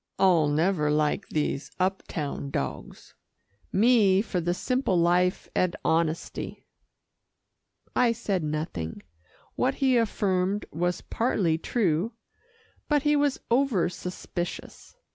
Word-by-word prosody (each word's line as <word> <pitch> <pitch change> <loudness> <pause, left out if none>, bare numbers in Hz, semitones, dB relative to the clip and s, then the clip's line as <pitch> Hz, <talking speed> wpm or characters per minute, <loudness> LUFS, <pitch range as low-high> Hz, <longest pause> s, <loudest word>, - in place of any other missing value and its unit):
I'll 175 -5 +4
never 155 +1 +1
like 150 0 0
these 150 -2 -1
up 190 +1 +1
town 145 -2 -4
dogs. 70 - -5 0.6
Me 205 -3 +4
for 180 -5 -2
the 175 +1 0
simple 255 -4 0
life 175 +2 +2
and 180 -1 +1
honesty." 165 0 -1 1.3
I 245 -2 +4
said 205 -6 -2
nothing. 150 - -4 0.5
What 265 +1 0
he 260 -2 +3
affirmed 200 -3 0
was 175 +2 -1
partly 185 -9 0
true, 195 0 0 0.8
but 295 -2 +3
he 295 0 +3
was 285 -2 +1
over 240 -9 +2
suspicious. 180 - -6
180 Hz, 110 wpm, -27 LUFS, 160-230 Hz, 1.3 s, I'll